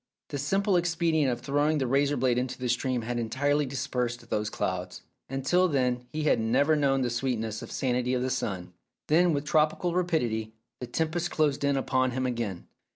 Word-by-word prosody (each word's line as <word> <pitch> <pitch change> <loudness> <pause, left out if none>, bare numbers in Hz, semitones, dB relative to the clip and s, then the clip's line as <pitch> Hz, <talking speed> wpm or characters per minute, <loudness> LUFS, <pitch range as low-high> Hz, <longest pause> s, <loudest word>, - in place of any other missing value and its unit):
The 145 - -4
simple 195 +6 +2
expedient 165 -5 +1
of 120 0 -4
throwing 145 +3 +1
the 135 - 0
razor 140 +3 +2
blade 125 -1 +2
into 130 0 -3
the 125 -1 -3
stream 125 0 0
had 120 +1 -2
entirely 140 +5 0
dispersed 125 -2 -3
those 105 0 0
clouds, 90 -2 -3 0.3
and 135 0 -4
till 180 +5 +4
then 125 -5 0
he 155 +2 -3
had 150 - +3
never 135 +8 +3
known 135 -2 +2
the 120 - -1
sweetness 115 -3 -2
and - - -8
sanity 125 -1 0
of 125 - 0
the 130 - -1
sun. 90 -6 -3 0.4
Then, 170 +3 +4
with 145 -1 -1
tropical 155 +3 +2
rapidity, 120 -12 0 0.3
the 125 - -5
tempest 165 +6 -1
closed 145 -3 +1
in 140 -1 +2
upon 130 -1 +1
him 130 - 0
again. 115 -8 -3
130 Hz, 190 wpm, -28 LUFS, 120-150 Hz, 0.4 s, till